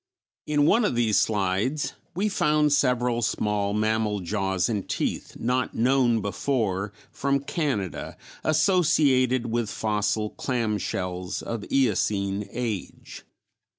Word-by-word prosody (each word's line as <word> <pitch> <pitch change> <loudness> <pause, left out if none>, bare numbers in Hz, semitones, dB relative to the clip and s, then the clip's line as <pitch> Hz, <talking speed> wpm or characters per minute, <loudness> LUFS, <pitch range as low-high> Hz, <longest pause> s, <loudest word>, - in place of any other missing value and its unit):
In 145 -1 +3
one 230 +9 +4
of 205 - +1
these 115 -3 +3
slides 105 +7 0 0.2
we 195 +4 +1
found 150 -6 +2
several 125 -4 +2
small 105 -2 0
mammal 110 0 0
jaws 95 -1 0
and 105 -4 -3
teeth - - -2
not 125 +2 -1
known 120 -2 +3
before 100 -2 -1 0.2
from 140 0 0
Canada, 140 - -3 0.3
associated 150 -7 +3
with 115 -2 0
fossil 105 0 -1
clam 115 -5 -1
shells 90 0 -3
of 115 -3 -4
Eocene 100 -5 +1
age. 115 -6 -5
115 Hz, 115 wpm, -25 LUFS, 105-135 Hz, 0.3 s, one